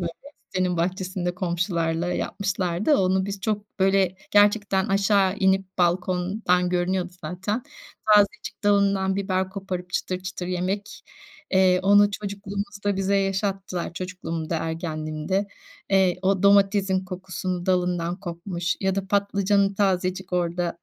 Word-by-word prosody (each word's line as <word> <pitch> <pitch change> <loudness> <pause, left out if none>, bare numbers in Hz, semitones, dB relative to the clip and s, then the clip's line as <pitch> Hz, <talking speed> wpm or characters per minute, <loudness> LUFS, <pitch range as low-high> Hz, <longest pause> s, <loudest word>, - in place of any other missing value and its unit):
böyle 170 -1 -2 0.4
sitenin 185 -2 -1
bahçesinde 180 +1 -2
komşularla 170 -1 -1
yapmışlardı. 195 - 0
Onu 190 0 +2
biz 200 -1 -5
çok 210 +1 -1
böyle 190 -1 +3 0.2
gerçekten 205 -2 +3
aşağı 195 -1 +2
inip 190 -1 +1
balkondan 180 +1 +1
görünüyordu 180 0 -1
zaten. 190 +8 -3 0.5
Tazecik 205 0 +1
dalından 200 -2 +2
biber 190 -1 -1
koparıp 190 -2 -5
çıtır 185 +1 -2
çıtır 180 -1 -5
yemek, 185 +3 -3 0.5
eee, 185 -1 +4
onu 205 +1 +5
çocukluğumuzda 200 0 -4
bize 195 +1 +1
yaşattılar. 195 -2 -2
Çocukluğumda, 170 -3 -4
ergenliğimde. 160 +3 -2 0.4
Eee, 190 -2 +3
o 190 0 +1
domatesin 200 -1 +4
kokusunu 185 -1 -4
dalından 180 -1 0
kopmuş 175 -1 -3
ya 190 -1 +1
da 195 0 -2
patlıcanın 200 0 +2
tazecik 190 -1 0
orada 175 -1 -1
190 Hz, 115 wpm, -24 LUFS, 180-200 Hz, 0.5 s, onu